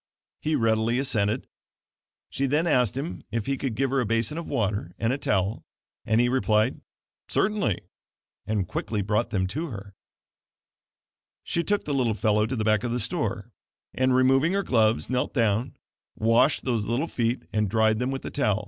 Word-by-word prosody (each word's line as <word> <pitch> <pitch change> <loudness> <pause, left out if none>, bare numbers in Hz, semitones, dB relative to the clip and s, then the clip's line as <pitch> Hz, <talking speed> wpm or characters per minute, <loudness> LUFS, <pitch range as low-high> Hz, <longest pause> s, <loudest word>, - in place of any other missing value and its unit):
He 155 0 0
readily 115 -1 +2
assented. 115 -4 +1 0.9
She 140 - 0
then 150 +5 +1
asked 125 - +2
him 150 +5 -4
if 115 -3 -2
he 135 - 0
could 130 -4 -3
give 135 +3 0
her 135 - +2
a 125 - +1
basin 115 +5 0
of 170 0 -5
water 100 - -2
and 115 +2 0
a - - -1
towel, 100 -2 0 0.4
and 110 +1 +3
he 120 - +4
replied: 110 -4 +1 0.5
"Certainly," 200 - +1 0.7
and 105 -4 0
quickly 105 +1 -2
brought 105 +4 0
them 95 -4 0
to 150 - -3
her. 100 -6 -8 1.5
She 170 - -1
took 205 +2 0
the 145 - -2
little 120 -5 +1
fellow 105 0 +2
to 130 - -3
the 110 - -1
back 110 -1 +3
part - - -5
of 120 - -1
the 125 - -1
store, 120 - -3 0.4
and, 130 0 +2
removing 135 +6 +4
her 200 0 +1
gloves 110 - +2
knelt 125 +2 -1
down, 115 -1 +1 0.4
washed 115 +6 +3
those 115 -5 0
little 120 +8 0
feet 120 -5 -1
and 105 -2 +1
dried 110 0 +2
them 125 +1 0
with 135 0 -4
the - - -5
towel. 110 -8 +1
115 Hz, 185 wpm, -26 LUFS, 110-135 Hz, 1.5 s, he